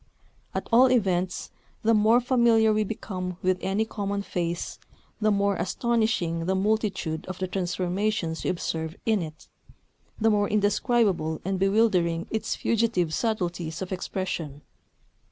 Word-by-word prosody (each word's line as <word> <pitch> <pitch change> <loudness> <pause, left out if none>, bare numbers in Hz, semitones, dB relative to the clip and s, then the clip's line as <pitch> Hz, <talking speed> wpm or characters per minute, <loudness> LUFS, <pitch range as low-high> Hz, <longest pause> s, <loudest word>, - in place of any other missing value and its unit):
At - - -2
all 250 +3 +6
events, 185 -6 0 0.3
the 225 +1 +4
more 220 +2 +5
familiar 235 -3 +4
we 215 0 +2
become 185 -4 -5
with 185 0 +2
any 200 +3 0
common 200 -2 -3
face, 170 -3 -3 0.4
the 215 -1 +2
more 200 -1 +2
astonishing 190 -6 0
the 190 - +2
multitude 195 -5 0
of 185 -1 -5
the 185 - -2
transformations 180 -1 -1
we - - 0
observe 160 -2 -3
in 220 -3 +2
it, 155 -2 -8 0.7
the 225 0 +3
more 205 -1 +2
indescribable 205 - +1
and 190 0 -1
bewildering 190 -5 +2
its 220 0 -1
fugitive 220 -8 +1
subtleties 175 -6 -2
of 185 - -8
expression. 180 -6 -4
195 Hz, 135 wpm, -26 LUFS, 175-220 Hz, 0.7 s, all